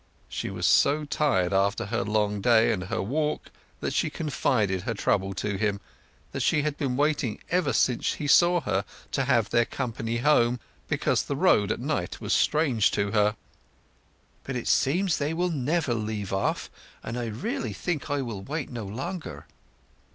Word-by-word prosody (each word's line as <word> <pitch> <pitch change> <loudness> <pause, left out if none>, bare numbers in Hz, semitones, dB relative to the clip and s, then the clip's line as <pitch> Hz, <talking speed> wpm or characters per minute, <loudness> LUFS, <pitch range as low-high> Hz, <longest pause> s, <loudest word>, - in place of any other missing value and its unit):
She - - -4
was 90 -2 -3
so 150 - +4
tired 100 -12 +1
after 100 +4 +1
her 115 +4 -1
long 105 -1 0
day 115 0 +5
and 95 -4 -2
her 110 +2 -2
walk 150 +7 -2 0.3
that - - -2
she - - +1
confided 110 - 0
her - - -3
trouble 95 -1 0
to 100 +2 -2
him—that 100 - -5
she 150 - +2
had 150 -1 -1
been 130 -4 -2
waiting 145 -6 +1
ever 180 +1 +2
since 125 -2 +1
he 150 - -5
saw 175 +4 +5
her 95 -8 0 0.3
to 135 - 0
have 120 -5 +2
their 120 0 +4
company 115 -3 -3
home, 120 -2 +3 0.3
because - - +1
the - - -3
road - - +3
at - - -2
night - - -2
was - - -1
strange 140 -9 +3
to 100 0 0
her. 105 0 +2 1.1
"But 135 - -5
it 120 - -3
seems 170 +6 +2
they 150 +3 -1
will 175 +1 0
never 145 -1 0
leave 105 -3 -3
off, 95 - -1 0.3
and 115 - -5
I 120 -1 -2
really 110 +1 -3
think 155 - -3
I 145 -1 0
will 110 -6 -5
wait 145 +8 -4
no 115 -4 -5
longer." 170 - -6
120 Hz, 175 wpm, -27 LUFS, 105-150 Hz, 1.1 s, day